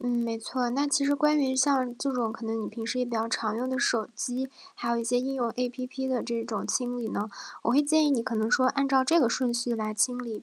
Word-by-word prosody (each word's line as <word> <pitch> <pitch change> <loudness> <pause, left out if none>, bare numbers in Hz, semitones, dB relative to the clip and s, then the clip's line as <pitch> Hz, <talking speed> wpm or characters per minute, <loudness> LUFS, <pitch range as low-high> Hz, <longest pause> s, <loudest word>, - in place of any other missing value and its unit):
嗯， 245 - -2
没 235 -1 0
错。 245 +2 -2
那 280 +4 +1
其 280 0 +2
实 285 +1 +3
关 300 +2 +3
于 265 -2 +1
像 260 -2 +2
这 275 +2 -1
种 235 -3 -1
可 225 - -8
能 225 0 -2
你 - - -4
平 225 -1 -7
时 245 +2 -2
也 250 - +2
比 240 - -8
较 225 0 0
常 220 -1 -1
用 255 +2 -2
的 260 - -1
手 230 -5 +1
机， 255 +3 -3 0.3
还 235 -9 -3
有 235 - +1
一 230 - -2
些 245 +1 +2
应 270 +2 -2
用 245 -3 0
APP 255 +1 -3
的 255 -3 0
这 235 -1 -2
种 225 -2 -4
清 245 -1 -1
理 235 - -3
呢， 210 - -2 0.3
我 - - +1
会 270 +4 +5
建 310 +1 +3
议 295 - +3
你 265 -4 +2
可 240 0 -3
能 220 0 0
说， 255 0 +4
按 275 +1 +1
照 265 -1 +4
这 330 +5 +4
个 245 - +4
顺 245 0 0
序 240 0 0
来 215 -1 -3
清 245 +4 +1
理 230 -4 -6
245 Hz, 320 characters per minute, -28 LUFS, 230-265 Hz, 0.3 s, 会